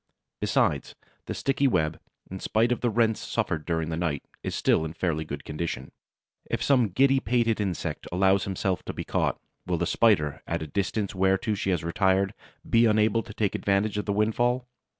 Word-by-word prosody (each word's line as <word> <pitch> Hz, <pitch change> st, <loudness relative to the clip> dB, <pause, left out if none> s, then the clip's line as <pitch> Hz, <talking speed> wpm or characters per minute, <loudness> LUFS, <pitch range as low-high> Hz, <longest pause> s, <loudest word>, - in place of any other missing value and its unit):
Besides, -, -, +1 dB, 0.3 s
the -, -, -3 dB
sticky 140 Hz, 0 st, +1 dB
web, 80 Hz, -9 st, +1 dB, 0.3 s
in 95 Hz, -, -5 dB
spite 115 Hz, +5 st, +1 dB
of 125 Hz, -, 0 dB
the 120 Hz, -, +2 dB
rents 110 Hz, 0 st, +2 dB
suffered 75 Hz, -2 st, -2 dB
during 80 Hz, -2 st, -1 dB
the 80 Hz, -, -2 dB
night, 80 Hz, -4 st, -2 dB, 0.2 s
is -, -, -3 dB
still -, -, +2 dB
in 80 Hz, 0 st, -4 dB
fairly 80 Hz, -2 st, -1 dB
good 70 Hz, -2 st, -6 dB
condition. 80 Hz, +2 st, -4 dB, 0.6 s
If -, -, -1 dB
some 130 Hz, -5 st, +4 dB
giddy 135 Hz, +7 st, +4 dB
pated 115 Hz, -2 st, +1 dB
insect 95 Hz, -5 st, -3 dB
allow 95 Hz, +2 st, +3 dB
himself 95 Hz, -1 st, -2 dB
to -, -, -4 dB
be -, -, -5 dB
caught, -, -, 0 dB, 0.3 s
will 90 Hz, -1 st, 0 dB
the 85 Hz, -, 0 dB
Spider, 80 Hz, -10 st, +2 dB
at 85 Hz, -, -1 dB
the -, -, -3 dB
distance 100 Hz, +6 st, -2 dB
whereto 95 Hz, +3 st, +1 dB
she 100 Hz, -1 st, -2 dB
has 90 Hz, -4 st, 0 dB
retired, 95 Hz, +3 st, +1 dB, 0.3 s
be 115 Hz, 0 st, +5 dB
unable 110 Hz, +1 st, +3 dB
to 110 Hz, -2 st, -11 dB
take 105 Hz, -3 st, 0 dB
advantage 100 Hz, +1 st, 0 dB
of -, -, -3 dB
the 100 Hz, -, 0 dB
windfall? 120 Hz, +4 st, +1 dB
100 Hz, 190 wpm, -27 LUFS, 85-110 Hz, 0.6 s, be